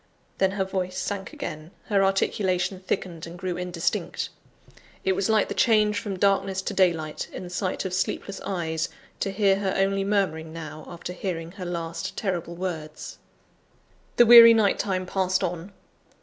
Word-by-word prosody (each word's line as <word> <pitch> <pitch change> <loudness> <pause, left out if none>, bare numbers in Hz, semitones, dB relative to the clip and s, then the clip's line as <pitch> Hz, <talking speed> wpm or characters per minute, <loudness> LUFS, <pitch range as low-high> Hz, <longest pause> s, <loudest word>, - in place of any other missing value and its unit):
Then 190 0 +2
her 195 -1 0
voice 185 -1 -3
sank 195 -2 -3
again; 155 +1 -6 0.2
her 200 -2 +2
articulation 190 -1 +1
thickened, 180 -3 -4
and 170 +1 -9
grew 180 0 -3
indistinct. 180 -1 -2 0.8
It 190 - +3
was 190 +2 0
like 220 -1 +3
the - - -3
change 215 -2 +3
from 200 -4 -4
darkness 195 0 +1
to - - -3
daylight, 165 -5 +1
in - - -7
the 175 - -8
sight 185 +1 -2
of 185 - -3
sleepless 190 +1 -2
eyes, 165 -4 -2 0.3
to 195 - -1
hear 195 0 +3
her 195 -1 -1
only 195 0 +1
murmuring 185 -6 0
now, 155 -1 -8
after 175 +1 -7
hearing 170 -3 -4
her 185 -1 -7
last 170 -1 -4
terrible 175 -4 -2
words. 165 -4 -6 1.0
The 240 - +7
weary 230 0 +10
night 210 -3 +3
time 185 -2 -1
passed 185 0 0
on. 175 +2 -3
185 Hz, 165 wpm, -25 LUFS, 170-195 Hz, 1.0 s, weary